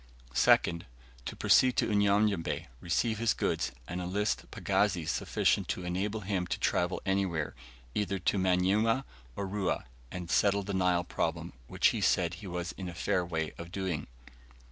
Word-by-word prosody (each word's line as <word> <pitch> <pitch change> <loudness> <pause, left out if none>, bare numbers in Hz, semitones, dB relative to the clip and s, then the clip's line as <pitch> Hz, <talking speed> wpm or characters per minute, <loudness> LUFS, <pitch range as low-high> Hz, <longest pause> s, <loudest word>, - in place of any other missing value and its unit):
2nd. 85 +6 +4 0.4
To - - -5
proceed 130 -1 +4
to - - +3
Unyanyembe, 100 -3 +2
receive 110 - 0
his 115 -1 +2
goods, - - 0 0.2
and 90 0 -4
enlist 100 +4 -1
pagazis - - 0
sufficient - - +1
to 90 - -3
enable 100 +5 -2
him 95 -2 -2
to - - -2
travel 90 +1 0
anywhere, 95 -6 0 0.4
either 100 -1 -1
to 95 +2 0
Manyuema 95 +7 +2 0.3
or 100 - -3
Rua, 95 0 -1 0.3
and 90 -2 -5
settle 100 0 +3
the 100 +1 -4
Nile 90 -2 +2
problem, 85 0 -2
which - - +3
he - - -2
said 85 -2 +2
he 95 +3 -8
was 90 -1 -3
in 95 -2 -6
a 85 - -8
fair 90 +1 0
way 80 -3 -3
of 85 0 -8
doing. 95 -5 -3
95 Hz, 160 wpm, -31 LUFS, 90-100 Hz, 0.4 s, 2nd